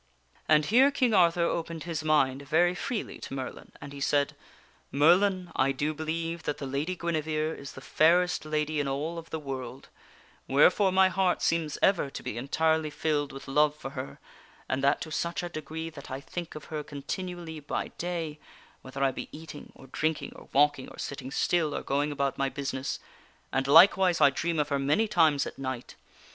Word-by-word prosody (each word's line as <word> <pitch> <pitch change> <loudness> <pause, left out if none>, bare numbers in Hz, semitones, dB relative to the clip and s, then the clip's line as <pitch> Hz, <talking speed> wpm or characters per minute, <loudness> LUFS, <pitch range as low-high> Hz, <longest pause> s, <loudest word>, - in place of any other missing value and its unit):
And 155 -1 +5
here 250 - +5
King 255 -4 +1
Arthur 170 -3 +4
opened 165 -1 -2
his 165 -3 -4
mind 140 -3 +2
very 175 +4 +3
freely 210 +4 -4
to - - -7
Merlin, 130 -1 -7
and 140 - -9
he 140 - -8
said: 140 0 +1 0.3
" - - -33
Merlin, 180 +5 +3
I 135 +1 +3
do 145 +3 -1
believe 165 +2 -3
that 150 - -3
the 140 - -5
Lady 140 +7 -2
Guinevere 160 -2 -1
is 140 - -9
the 130 - -10
fairest 175 +5 +3
lady 155 0 -1
in 145 - 0
all 150 +5 -2
of 165 - -12
the 160 - -3
world; 135 -3 -7 0.6
wherefore 180 +8 +4
my 190 0 +5
heart 185 -1 +1
seems 165 -3 0
ever 185 -7 +3
to - - -8
be - - -4
entirely 160 +5 +1
filled 145 -1 -1
with 135 - -10
love 150 +2 +3
for 135 -3 -7
her, 130 0 -6 0.5
and 130 +1 -1
that 140 +1 +3
to 155 - -6
such 170 +3 -2
a 175 - -3
degree 160 +1 -6
that 140 -3 -11
I 130 - -4
think 170 +4 -7
of 155 - -8
her 150 -1 -2
continu 175 +6 -5
ally 160 -2 -7
by 145 - -3
day 165 -3 -3 0.4
(whether 135 +1 -4
I 135 - +3
be - - -7
eating, 155 -1 -10
or - - -14
drinking, 155 +4 -2
or - - -14
walking, 145 -1 +2
or - - -13
sitting 135 -2 -5
still, 155 +2 +1
or - - -3
going 145 +2 0
about 140 -1 -1
my 135 0 +1
business), 135 -1 -3 0.6
and 135 +1 0
likewise 180 +3 +6
I 140 - +6
dream 170 +4 -2
of 150 -1 0
her 140 -1 0
many 150 +11 +2
times 160 -7 +3
at - - -8
night. 130 -2 -5
155 Hz, 195 wpm, -28 LUFS, 140-170 Hz, 0.6 s, likewise